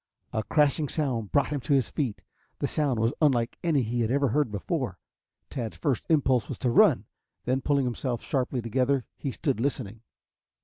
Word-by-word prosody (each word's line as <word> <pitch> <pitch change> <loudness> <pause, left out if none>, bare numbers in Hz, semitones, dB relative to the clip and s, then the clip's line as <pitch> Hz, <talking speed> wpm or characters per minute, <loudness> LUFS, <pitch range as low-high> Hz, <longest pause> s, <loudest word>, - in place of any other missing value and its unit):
A 110 - +1
crashing 150 +3 +2
sound 125 -9 -2
brought 140 - +3
him 145 -1 -1
to 140 +3 0
his 135 - +1
feet. 130 -9 -2 0.3
The - - -1
sound 140 -6 0
was 115 +2 +2
unlike 125 -6 +2
any 155 -6 +2
he 120 +2 -1
had 110 - +1
ever 140 +1 +2
heard 145 -1 +1
before. 105 - -2 0.5
Tad's 115 -4 -4
first 140 -7 -1
impulse 130 -7 +3
was - - -4
to 125 - 0
run, - - +5 0.4
then, 130 +2 +1
pulling 140 -1 +2
himself 120 0 -2
sharply 130 -2 -1
together, 130 +2 +1
he 140 - -4
stood 135 -2 -1
listening. 115 -4 -2
130 Hz, 180 wpm, -27 LUFS, 115-145 Hz, 0.5 s, run